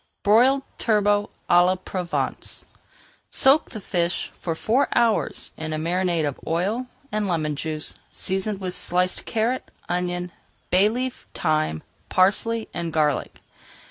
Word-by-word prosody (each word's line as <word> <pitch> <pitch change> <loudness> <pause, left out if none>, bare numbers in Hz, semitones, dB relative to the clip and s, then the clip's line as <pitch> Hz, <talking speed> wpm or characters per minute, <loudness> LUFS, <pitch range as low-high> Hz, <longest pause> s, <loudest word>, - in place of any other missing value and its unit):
BROILED 250 +6 +5 0.2
TURBOT 205 -2 +2 0.2
À 175 0 +6
LA 185 +1 +3
PROVENCE 185 -1 -4 0.6
Soak 270 +4 +4
the 220 - -7
fish 175 -3 -1
for 165 -2 -2
four 235 +11 +2
hours 230 -2 +1
in 155 0 -4
a - - -1
marinade 170 0 0
of 140 - -5
oil 200 +10 0 0.2
and 210 -1 0
lemon 155 -4 0
juice, 155 +1 -3 0.2
seasoned 195 +2 -2
with 185 -2 -4
sliced 180 +1 0
carrot, 230 +3 -1 0.2
onion, 180 0 -2 0.4
bay 190 +3 +5
leaf, 250 +3 -4
thyme, 155 - 0 0.3
parsley, 220 +5 +2
and 170 -1 -3
garlic. 150 -3 0
185 Hz, 130 wpm, -24 LUFS, 170-215 Hz, 0.6 s, À